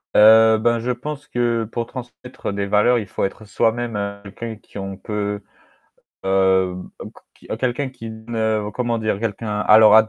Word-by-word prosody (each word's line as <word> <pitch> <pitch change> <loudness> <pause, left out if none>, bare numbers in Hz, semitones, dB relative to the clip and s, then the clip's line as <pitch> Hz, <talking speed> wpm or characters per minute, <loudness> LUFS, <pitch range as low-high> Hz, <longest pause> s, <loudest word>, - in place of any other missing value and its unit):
Heu, 110 +1 +8
bah 115 +1 +2
je 120 +2 -3
pense 145 +4 -6
que 120 -2 0
pour 115 -1 -2
transmettre 125 -3 -7
des 100 0 -2
valeurs, 105 +5 +3
il 110 - -2
faut - - -3
être 110 +2 -6
soi-même 105 -2 -1
quelqu'un 110 +3 -7
qui 105 - -11
on 95 -1 -5
peut, 105 0 -3 0.8
hem, 95 -1 +2
heuc - - -9 0.2
qui - - -19
quelqu'un 130 +3 -1
qui 115 -3 -9
ne, 110 -1 -2
comment 120 -2 -1
dire, 110 -2 -1
quelqu'un 105 -1 -2
alors 110 0 +7
110 Hz, 160 wpm, -21 LUFS, 105-120 Hz, 0.8 s, Heu